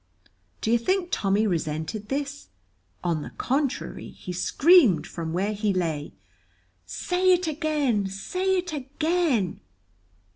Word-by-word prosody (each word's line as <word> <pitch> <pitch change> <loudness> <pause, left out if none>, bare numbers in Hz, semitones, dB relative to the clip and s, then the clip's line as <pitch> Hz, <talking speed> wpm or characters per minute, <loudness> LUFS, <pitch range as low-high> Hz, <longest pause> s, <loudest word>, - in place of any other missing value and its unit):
Do 220 - 0
you 235 - +4
think 370 +7 0
Tommy 200 +2 +2
resented 165 +3 -2
this? 285 +1 -3 0.6
On 170 -3 0
the - - -6
contrary 275 +1 -2
he 180 - -8
screamed 270 - +5
from 165 -2 -5
where 195 +5 0
he 210 -1 0
lay, 160 - -2 0.7
"Say 360 - +1
it 360 0 +1
again! 295 -9 0
say 365 - -1
it 355 -2 -3
again!" 290 - 0
235 Hz, 120 wpm, -26 LUFS, -, 0.7 s, screamed